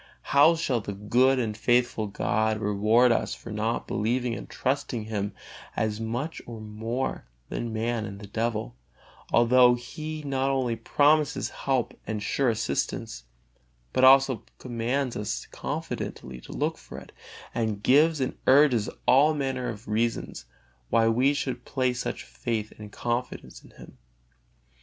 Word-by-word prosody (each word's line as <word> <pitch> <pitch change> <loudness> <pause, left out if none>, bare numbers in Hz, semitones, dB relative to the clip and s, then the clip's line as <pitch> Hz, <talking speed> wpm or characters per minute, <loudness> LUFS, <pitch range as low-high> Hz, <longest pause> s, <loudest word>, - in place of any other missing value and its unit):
How 150 +4 +7
shall 135 -8 0
the 100 - -5
good 125 +6 +3
and 110 -4 -1
faithful 120 -1 +1
God 110 +2 0
reward 110 +4 +3
us 115 - 0
for - - -10
not 110 +2 -1
believing 120 +3 0
and - - -7
trusting 130 -4 -2
Him 105 -2 -3 0.4
as 110 -1 -1
much 120 +8 -3
or 115 -2 -7
more 110 - -4 0.2
than 120 -1 -3
man 115 0 -1
and 100 -1 -7
the 105 - -9
devil, 110 - -2 0.6
although 125 +1 +6
He 155 +5 -7
not 135 -1 0
only 130 -4 0
promises 150 +4 +2
help 130 -3 -1
and 105 -1 -3
sure 135 +4 +1
assistance, 70 - -2 0.7
but 130 - +2
also 135 -3 +6 0.2
commands 125 +2 -2
us 100 -13 -3
confidently 65 -1 -5
to - - -12
look - - -2
for - - -11
it, - - -11 0.4
and 110 -3 -2
gives 155 +4 +4
and 130 - -1
urges 130 -6 +5 0.2
all 145 +4 +5
manner 130 -3 -2
of 105 0 -8
reasons 115 +2 -2 0.4
why 115 -1 +3
we 125 +5 +3
should 125 -3 -3
place 125 -2 -1
such - - -4
faith 85 - -4
and 105 -1 -9
confidence 120 +3 -4
in - - -16
Him? - - -15
120 Hz, 145 wpm, -27 LUFS, 110-130 Hz, 0.7 s, How